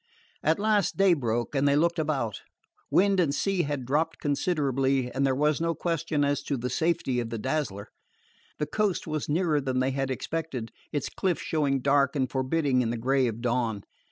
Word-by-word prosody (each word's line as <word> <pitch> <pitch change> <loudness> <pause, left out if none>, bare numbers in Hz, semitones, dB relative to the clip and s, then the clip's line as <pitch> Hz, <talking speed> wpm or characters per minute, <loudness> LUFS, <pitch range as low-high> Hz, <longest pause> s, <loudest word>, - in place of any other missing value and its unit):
At - - +2
last 210 -3 +1
day 195 -2 +5
broke, 120 -5 -1
and 140 0 +2
they 140 - +4
looked 170 +3 +2
about. 135 - -1 0.5
Wind 195 0 +3
and 150 -5 +2
sea 195 +1 +1
had 145 -4 -3
dropped 150 +6 0
considerably, 135 -4 0
and 135 - -1
there 130 - +1
was 150 +3 +1
no 165 0 0
question 165 -3 0
as 140 0 0
to 140 - -1
the 125 0 -3
safety 155 -5 0
of 115 -1 -3
the 115 - -4
Dazzler. 115 -5 -2 0.7
The 150 - -1
coast 210 +2 -1
was 155 -2 -3
nearer 155 -1 +2
than 130 -1 -1
they 130 +1 +1
had 135 0 -2
expected, 130 -3 -4 0.2
its 145 -3 -2
cliffs 185 -4 -1
showing 140 -4 0
dark 140 +1 +3
and 130 -2 +1
forbidding 130 0 +1
in 115 - 0
the 120 - -2
gray 130 +2 +2
of 115 0 -4
dawn. 115 -4 -1
140 Hz, 190 wpm, -27 LUFS, 130-160 Hz, 0.7 s, day